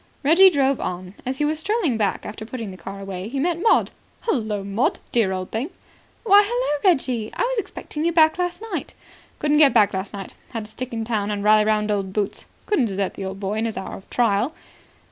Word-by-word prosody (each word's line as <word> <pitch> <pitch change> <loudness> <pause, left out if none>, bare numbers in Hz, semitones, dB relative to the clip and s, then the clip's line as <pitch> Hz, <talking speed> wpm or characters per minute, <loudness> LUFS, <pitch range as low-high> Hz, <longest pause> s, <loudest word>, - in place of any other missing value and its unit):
Reggie 340 +7 +7
drove 275 -5 +1
on. 180 +1 -4
As 260 +1 -2
he 295 - +1
was 305 +1 0
strolling 400 - 0
back 210 -3 -1
after 215 +1 -7
putting 225 -2 -6
the - - -9
car 195 +1 -8
away 195 -1 -5
he 270 +4 -3
met 340 +3 0
Maud. 450 - +3 0.3
"Hullo, 215 - -1
Maud, 200 +6 0
dear 225 -5 +2
old 185 -1 -4
thing." 240 +8 -2 0.5
"Why, 410 -2 +7
hullo, 445 -9 -1
Reggie. 250 -8 -1
I - - 0
was - - 0
expecting 310 -6 -5
you 340 - +2
back 320 0 +4
last 355 +4 -2
night." - - -4 0.4
"Couldn't 300 0 +2
get 280 -6 +6
back 210 -3 +5
last 190 +1 -3
night. 195 -2 -7 0.2
Had 225 -2 -4
to 215 - -12
stick 255 +3 -6
in 225 -1 -3
town 215 -3 -1
and 205 -1 -2
rally 215 0 +5
round 215 0 +1
old 195 -2 -2
Boots. 205 -1 -2 0.2
Couldn't 355 - +2
desert 195 -1 -2
the 195 - -6
old 190 +1 -5
boy 205 +2 -2
in 225 - 0
his 225 - -3
hour 190 - -5
of 195 - -13
trial." 235 +5 +1
225 Hz, 220 wpm, -23 LUFS, 200-300 Hz, 0.5 s, Reggie